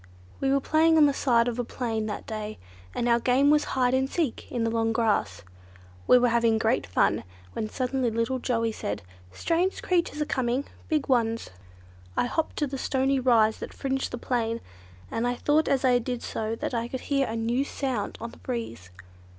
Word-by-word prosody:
We 270 0 +1
were 275 - +4
playing 320 +3 +3
on 305 - +7
the 285 - +3
side 240 -4 +3
of 245 0 -2
a - - +1
plain 225 -3 -3
that 210 - -5
day, 215 -1 -5 0.4
and 240 - 0
our 235 0 +4
game 260 +4 +3
was 300 0 +3
hide 250 -1 +3
and 265 +1 +1
seek 315 -7 -2
in 240 -2 -1
the 225 - 0
long 225 0 +1
grass. 220 - 0 0.6
We 250 - +8
were 245 0 +3
having 230 -1 +3
great 225 +2 +1
fun, 90 - +2 0.3
when 215 - -3
suddenly 255 0 -1
little 230 +3 -1
Joey 230 -2 0
said, 105 - -4 0.3
'strange 340 - 0
creatures 345 -4 0
are 300 - +1
coming, 255 0 -1 0.2
big 305 -3 0
ones.' 230 - +1 0.7
"I - - +3
hopped 315 +6 -1
up - - -22
to 300 - 0
the 270 0 -5
stony 265 +1 +1
rise 230 -4 +3
that - - -7
fringed 270 0 -2
the 245 - -5
plain, 235 -2 -1 0.5
and 235 +2 0
I 245 - 0
thought 300 +5 +2
as 270 -1 +2
I 250 -1 +5
did 245 0 -4
so 220 0 -3
that 230 - -4
I 235 0 -1
could 260 +1 -5
hear 275 -2 0
a 225 - -3
new 235 +4 0
sound 260 -7 -3
on 230 +1 -6
the - - -15
breeze. 225 - -5
245 Hz, 205 wpm, -27 LUFS, 230-270 Hz, 0.7 s, We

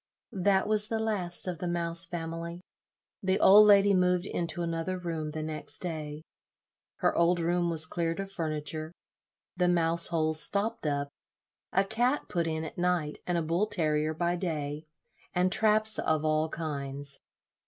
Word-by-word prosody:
That 190 0 +2
was 210 0 +3
the 225 - -2
last 200 -6 -1
of 175 -3 -4
the 180 - -4
Mouse 170 0 +3
family. 170 0 -6 0.6
The 190 0 0
old 210 +2 +7
lady 200 -1 +6
moved 180 -1 +2
into 175 -1 -3
another 165 +2 -3
room 165 -3 -4
the 155 0 -5
next 155 -1 -5
day. 155 -3 -6 0.8
Her - - +2
old 170 +1 +2
room 175 +1 0
was 160 -1 +4
cleared 165 +1 -3
of 195 0 -5
furniture, 155 -2 -4 0.7
the 180 0 +2
mouse 170 -1 +4
holes 155 -2 +2
stopped 205 -4 -1
up, 140 -1 -2 0.6
a 195 - +2
cat 240 +7 -1
put 170 -1 -1
in 160 0 -3
at 160 - -8
night, 175 -4 -1
and 175 -1 0
a 170 - -1
bull 170 +6 0
terrier 155 -5 0
by 175 +2 0
day, 155 -3 -4 0.5
and 180 +1 +2
traps 215 +1 +4
of 155 -1 0
all 155 +1 +1
kinds. 140 -3 -4
170 Hz, 160 wpm, -28 LUFS, 155-185 Hz, 0.8 s, old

